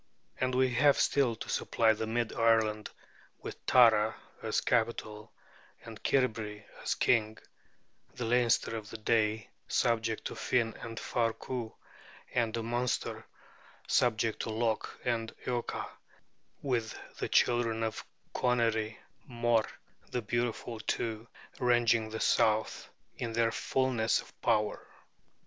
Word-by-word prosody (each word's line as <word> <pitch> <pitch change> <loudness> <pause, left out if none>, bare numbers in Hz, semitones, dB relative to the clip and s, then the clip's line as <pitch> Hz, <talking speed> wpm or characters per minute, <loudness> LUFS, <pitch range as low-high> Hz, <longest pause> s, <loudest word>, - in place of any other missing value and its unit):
And 130 0 0
we 130 0 +3
have 140 +3 +5
still 130 -5 +2
to - - -8
supply 110 -1 +2
the 110 +1 -4
mid 115 0 -1
Ireland, 110 -2 +2 0.5
with - - -8
Tara 110 -3 +5 0.3
as - - 0
capital, 110 -2 -1 0.5
and - - -10
Cairbre 110 -5 0 0.2
as - - -1
king; 110 -2 +2 0.8
the 125 - -3
Leinster 120 -1 +2
of 105 -1 -8
that 110 - -10
day, 110 -2 +1 0.2
subject 115 -2 0
to - - -4
Finn 115 -3 0
and 115 -1 -6
Far 115 -2 0
Cu; 120 -3 -5 0.6
and 115 -2 +1
the 115 0 -3
Munster, 120 +2 -2 0.6
subject 115 -2 +2
to - - -3
Lok 110 0 -1 0.2
and 115 -2 -1
Eocha, 120 -1 -2 0.8
with 120 -5 -1 0.2
the - - -2
children 115 -2 +2
of 110 0 -3 0.3
Conairy 115 -3 +1 0.3
Mór 120 -2 +2 0.4
the 125 - -2
Beautiful, 120 0 -2
too, 110 +1 -3 0.3
ranging 120 -3 +3
the 110 0 -5
south 110 -2 +1 0.3
in 115 -2 -3
their 115 0 +2
fullness 125 -3 +1
of - - -12
power. 105 0 +1
115 Hz, 125 wpm, -31 LUFS, 110-120 Hz, 0.8 s, have